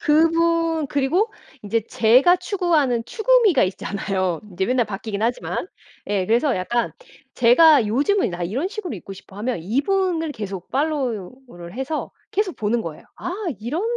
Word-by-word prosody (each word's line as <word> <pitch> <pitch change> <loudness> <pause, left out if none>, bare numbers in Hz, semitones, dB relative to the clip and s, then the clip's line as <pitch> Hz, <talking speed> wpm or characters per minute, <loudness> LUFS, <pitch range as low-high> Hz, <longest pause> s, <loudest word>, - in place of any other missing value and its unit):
그분 330 0 +2
그리고 325 - +1 0.3
인제 220 +2 0
제가 250 +10 +5
추구하는 330 - 0
추구미가 440 - +3
있잖아요 185 -1 -2
인제 190 +1 -2
맨날 245 -2 +1
바뀌긴 210 +1 -5
하지만. 245 +9 -2 0.4
예 200 -3 0
그래서 240 +4 +2
약간 235 +6 -1 0.4
제가 250 +1 +6
'요즘은 290 - +1
나 175 0 -5
이런 245 - -1
식으로 390 - -5
입고 195 +2 -9
싶어.' 195 0 -14
하면 235 +2 -2
이분을 325 - 0
계속 195 -6 -6
팔로우를 255 - -3
해서 265 +4 -3 0.2
계속 395 -2 -1
보는 220 +2 0
거예요. 160 -5 -8
'아 350 - -5 0.3
이런 285 - -2
255 Hz, 320 characters per minute, -22 LUFS, 205-330 Hz, 0.4 s, 제가